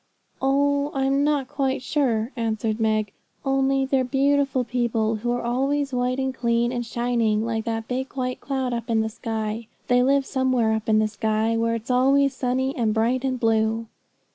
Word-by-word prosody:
'Oh, 285 +1 +2
I'm 270 +1 +2
not 290 -3 +1
quite 270 -2 -1
sure,' 245 -5 0
answered 225 -2 -1
Meg. 215 -2 +1 0.3
'Only 270 0 +2
they're 265 -1 +1
beautiful 275 0 +1
people, 230 -2 0
who 240 +3 -3
are 245 - -1
always 270 +3 0
white 250 +1 0
and 265 -1 -1
clean, 235 -1 +1
and 240 -1 -2
shining, 230 -2 0
like 225 -1 -2
that 225 -1 -3
big 260 +2 -3
white 255 -2 -3
cloud 265 -3 -2
up 235 0 -4
in 225 -1 +2
the 220 - -1
sky. 220 0 -4 0.2
They 245 0 +4
live 275 +2 +3
somewhere 255 -5 +1
up 220 0 -2
in 215 - +4
the 215 0 +3
sky, 220 +1 0
where 230 0 +1
it's 230 +2 -4
always 275 +2 +3
sunny, 260 +1 -1
and 225 -4 0
bright, 240 +4 +1
and 260 -2 -1
blue.' 225 0 +1
245 Hz, 180 wpm, -24 LUFS, 225-270 Hz, 0.3 s, They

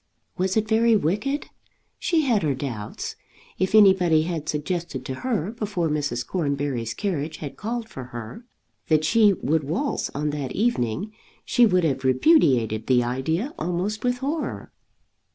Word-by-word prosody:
Was 190 +3 0
it 215 0 +1
very 225 +1 +4
wicked? 210 - 0 0.5
She 330 -2 +2
had 240 -8 +2
her 145 -4 0
doubts. 120 -6 -5 0.4
If 190 +3 +1
anybody 185 -6 +6
had 160 -2 -4
suggested 150 -3 -3
to 130 - -3
her, 215 -7 -1
before 205 -7 -2
Mrs. 145 -5 -1
Cornbury's 140 -8 -2
carriage 160 -6 -2
had 145 -3 -7
called 230 +2 -4
for 130 - -8
her, 120 - -8 0.4
that 155 -1 +3
she 210 +3 +5
would 160 -2 0
waltz 185 - -2
on 150 +1 -1
that 145 -3 -4
evening, 205 - -1 0.3
she 245 -2 +4
would 185 -3 +2
have 135 -4 0
repudiated 130 - +3
the 125 -2 +4
idea 160 - -2
almost 180 +6 -2
with 245 0 +1
horror. 290 +5 -3
170 Hz, 150 wpm, -24 LUFS, 140-215 Hz, 0.5 s, anybody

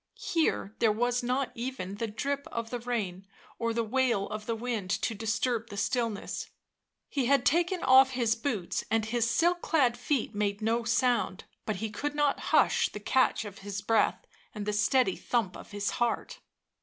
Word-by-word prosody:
Here 315 -10 0
there 225 -2 +4
was 245 +3 +1
not 255 +2 -1
even 235 -6 -4
the 230 - -2
drip 280 +6 -3
of 230 -1 -4
the 245 - -2
rain 200 -6 -3 0.3
or 230 0 0
the 230 0 0
wail 230 -3 +1
of 215 0 -6
the 230 - 0
'wind 225 -4 -3
to 200 +3 0
disturb 225 +2 -1
the 205 - -8
stillness; 230 -2 -2 0.6
he 270 -4 -1
had 275 -2 +3
taken 345 +3 +2
off 260 0 +7
his 235 -3 +2
boots, 225 -8 -2
and 225 -1 +1
his 235 +1 0
silk 345 +7 +2
clad 260 -7 +2
feet 245 -1 -1
made 205 -1 -1
no 225 +2 0
sound, 235 -4 +1 0.2
but 215 - 0
he 215 +2 -4
could 290 +8 -3
not 295 -1 +2
hush - - +4
the 210 - -7
catch 255 +1 +2
of 200 -1 -9
his 200 0 -5
breath 225 +2 +2 0.3
and 210 -1 -4
the 210 - -1
steady 250 +5 +3
thump 220 -7 -1
of - - -11
his 205 -1 -2
heart. 240 - -1
230 Hz, 180 wpm, -29 LUFS, 210-255 Hz, 0.6 s, off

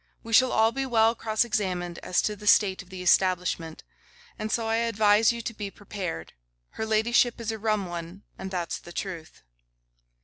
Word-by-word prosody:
We 230 - -7
shall 255 +3 +6
all 220 +1 +3
be 270 +2 -3
well 225 -2 +4
cross 220 0 0
examined 180 -6 -2
as 180 - 0
to 210 - -1
the 210 +1 -10
state 200 -2 +4
of 185 - -17
the 185 -1 -7
establishment; 180 -3 +1 0.6
and 215 0 -3
so 230 - 0
I 225 0 +1
advise 220 -1 +3
you 235 0 -6
to 230 - -4
be 210 -2 -5
prepared. 195 - -6 0.4
Her 220 - -5
ladyship 235 +2 +2
is 230 -1 -3
a 220 - -6
rum 215 -2 0
one, 175 +2 -7
and 190 - -7
that's 180 -3 -3
the 175 - -12
truth. 170 -5 -6
210 Hz, 190 wpm, -26 LUFS, 180-225 Hz, 0.6 s, shall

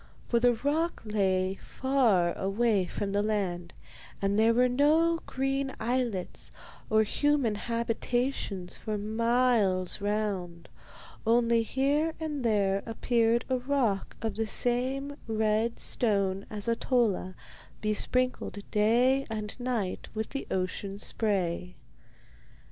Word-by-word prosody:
For 235 - +2
the 245 +1 +4
rock 295 +8 -1
lay 190 -2 0
far 235 -11 +2
away 200 0 +1
from 195 +3 -4
the 200 +1 +1
land, 185 -5 -2 0.4
and 200 +1 +1
there 225 +1 +5
were 250 +2 +4
no 310 +6 +3
green 270 0 -1
islets 235 -5 -1 0.4
or 220 0 +4
human 280 +1 +1
habitations 230 -3 -2
for 215 -1 -4
miles 220 -3 +1
round, 200 -5 -2 0.5
only 235 0 +3
here 285 +7 0
and 300 -4 -3
there 200 -3 +2
appeared 230 0 +1
a 260 -1 0
rock 245 -7 0
of 220 -2 -2
the 225 0 -1
same 265 +5 0
red 220 +1 +1
stone 200 -4 0
as 210 0 -3
Ahtola, 230 -5 +1 0.4
besprinkled 250 +2 0
day 245 +6 +3
and 215 -2 -4
night 240 -7 -2
with 220 0 -2
the 275 - -4
ocean 190 +1 -2
spray. 185 -5 -1
225 Hz, 115 wpm, -29 LUFS, 200-250 Hz, 0.5 s, there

